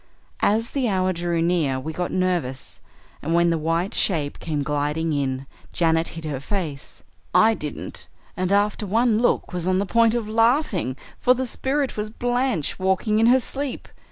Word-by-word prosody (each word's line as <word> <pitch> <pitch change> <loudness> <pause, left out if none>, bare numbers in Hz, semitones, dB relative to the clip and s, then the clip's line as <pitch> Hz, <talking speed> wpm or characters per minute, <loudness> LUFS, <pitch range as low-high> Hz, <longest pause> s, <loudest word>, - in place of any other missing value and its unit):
As 225 +3 +1
the 265 -4 0
hour 185 -1 +1
drew 170 -1 -1
near 160 -7 +1
we 160 +4 -5
got 180 +2 -2
nervous, 175 -8 -2 0.4
and 165 +3 0
when 170 0 +4
the 165 - +1
white 165 +4 0
shape 150 -7 0
came 150 -3 -2
gliding 150 +2 -1
in 135 -2 -1 0.3
Janet 165 -1 +2
hid 165 - -6
her 145 -4 -3
face. 150 -3 -5 0.3
I 225 +1 +6
didn't, 150 -8 -5 0.3
and 185 +1 -1
after 205 +1 +1
one 225 +2 +3
look 240 -5 +1
was 175 -1 -3
on 185 0 +2
the 200 - +1
point 230 +2 +3
of 230 -3 -2
laughing, 225 - +1 0.2
for 250 0 +4
the 260 +1 -2
spirit 270 +2 -1
was 210 0 -2
Blanche 245 - -1
walking 190 +3 +1
in 225 - +5
her 255 +2 +6
sleep. 275 +2 -4
185 Hz, 175 wpm, -23 LUFS, 160-225 Hz, 0.4 s, I